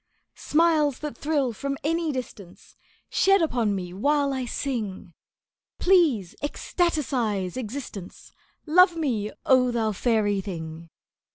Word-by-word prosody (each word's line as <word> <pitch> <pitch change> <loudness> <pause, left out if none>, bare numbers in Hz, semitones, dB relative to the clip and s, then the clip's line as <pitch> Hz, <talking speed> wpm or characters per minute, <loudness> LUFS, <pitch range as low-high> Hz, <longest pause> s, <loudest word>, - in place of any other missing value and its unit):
"Smiles 305 -4 +2
that 300 -1 -6
thrill 285 -5 0
from 275 +4 -4
any 330 +1 0
distance 215 -9 -8 0.3
Shed 390 +1 +3
upon 240 - +1
me 180 -2 -5
while 280 +7 +1
I 260 -1 -2
sing! 220 - -4 0.6
Please 315 - +3
ecstaticize 265 - -1
existence, 235 -6 -7 0.3
Love 355 +2 +5
me, 235 -10 -1 0.2
oh, 255 -1 +4
thou 225 -3 0
fairy 205 -2 +1
thing!" 165 -3 -7
255 Hz, 110 wpm, -25 LUFS, 205-300 Hz, 0.6 s, Love